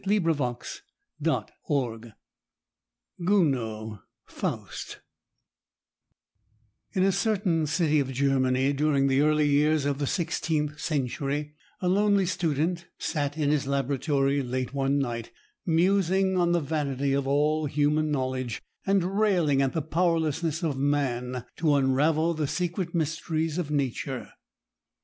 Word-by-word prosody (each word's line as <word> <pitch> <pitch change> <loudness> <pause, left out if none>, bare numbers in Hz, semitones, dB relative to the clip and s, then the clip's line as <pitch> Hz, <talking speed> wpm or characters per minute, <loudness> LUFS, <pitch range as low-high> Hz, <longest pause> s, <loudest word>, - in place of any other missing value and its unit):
[Illustration: 165 - -1 0.4
GOUNOD] 120 -5 -2 2.1
FAUST - - -5 1.9
In 185 -3 +2
a 195 - +4
certain 195 -5 +1
city 155 -1 +2
of 135 -2 -1
Germany, 130 0 +2
during 140 -1 +2
the 135 0 +3
early 150 0 +3
years 150 +1 +3
of 140 -1 -1
the 145 - -1
sixteenth 150 -3 -1
century, 145 0 -2 0.3
a 180 - 0
lonely 200 +1 +3
student 170 0 -1
sat 145 -1 -2
in 145 -2 +1
his 145 -3 0
laboratory 140 +1 +1
late 130 0 -3
one 140 0 +1
night, 120 -4 -2 0.4
musing 190 +2 +2
on 175 -1 +2
the 175 - +3
vanity 140 -2 -1
of 140 -1 0
all 150 +2 +2
human 150 +2 +1
knowledge, 130 -4 -2 0.3
and 195 0 +1
railing 175 -10 +3
at 135 -1 +1
the 160 - -1
powerlessness 165 0 0
of 145 -5 -1
man 130 -3 -1
to 155 -3 +3
unravel 150 +5 +2
the 155 -2 -1
secret 175 +2 -2
mysteries 160 0 -1
of 160 -5 -3
Nature. 140 -5 -2
150 Hz, 115 wpm, -27 LUFS, 135-170 Hz, 2.1 s, a